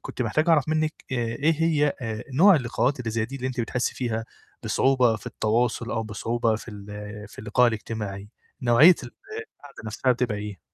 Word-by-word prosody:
كنت - - -4
محتاج 150 +8 0
أعرَف 155 -3 +4
منِّك 155 0 +1 0.2
آآ - - 0
إيه 120 +7 +1
هي 150 -3 +3
آآ 110 -2 -4
نوع 190 +8 +7
اللقاءات 125 0 0
اللي 115 -2 -3
زي 110 0 0
دي 135 +4 -7
اللي 130 -1 -4
أنتِ 130 -2 -2
بتحسّي 125 +2 -1
فيها 115 -3 -2 0.4
بصعوبة 130 -4 +3
في - - -14
التواصل 115 +2 0
أو 110 - -1
بصعوبة 115 +1 -1
في 110 - -11
ال 100 -1 -10 0.4
في - - -17
اللقاء 110 +4 +3
الإجتماعي. 105 -3 -5 0.3
نوعيّة 125 +9 +7
ال 120 - -8 0.4
القعدة 145 -4 -14
نَفْسها 120 +4 +1
بتبقى 120 -4 -1
إيه؟ 105 -2 -6
120 Hz, 185 wpm, -25 LUFS, 110-135 Hz, 0.4 s, نوع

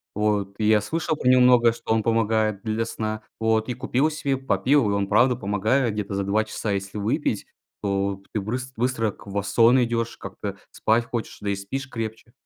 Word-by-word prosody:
вот. 105 -2 0
Я 110 0 +4
слышал 160 - -2
про 125 - -2
него 130 0 +6
много, 120 -2 +6
что 115 -1 -6
он 110 - +2
помогает 110 -2 +1
для 110 +1 -1
сна 110 -1 -4 0.2
вот. 110 0 +1
И 125 - 0
купил 130 +5 +1
себе, 140 -3 -1
попил, 130 +2 +2
он 100 -1 0
правда 125 +4 +4
помогает 110 +3 +1
где-то 105 -2 -4
за 100 - 0
2 110 +3 +1
часа. 110 -1 -3
Если 100 +1 -3
выпить, 110 +1 -1 0.4
то 100 -1 -1
ты 110 - 0
брыс 125 +6 -4
быстро 115 -2 0
к - - -17
в 100 0 -2
сон 115 +5 +4
идешь, 115 -1 -2
как-то - - -6
спать 115 +2 +1
хочешь, 120 -1 -5
да 105 - -2
и 100 - +1
спишь 130 +8 -5
крепче. 115 -1 -6
110 Hz, 195 wpm, -24 LUFS, 100-125 Hz, 0.4 s, него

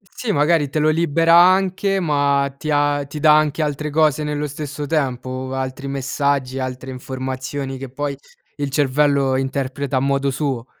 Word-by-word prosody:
Sì, 230 -4 -2
magari 150 0 +2
te 155 - -1
lo 155 +1 +3
libera 165 +1 +2
anche, 190 +2 +3
ma 140 -3 +1
ti 155 - -5
ha 145 -1 +1
ti 150 +1 -7
dà 150 -1 +6
anche 155 0 +1
altre 150 0 -2
cose 155 -1 +2
nello 150 0 -2
stesso 145 0 -6
tempo, 130 -3 -2
altri 130 +1 -4
messaggi, 135 -1 -1
altre 130 0 -5
informazioni 130 +1 -5
che 135 +1 -7
poi 140 +2 -4 0.4
il 145 -1 -2
cervello 140 -1 +2
interpreta 135 +1 -2
a - - +3
modo 140 0 +1
suo. 135 -3 -2
140 Hz, 160 wpm, -20 LUFS, 135-150 Hz, 0.4 s, dà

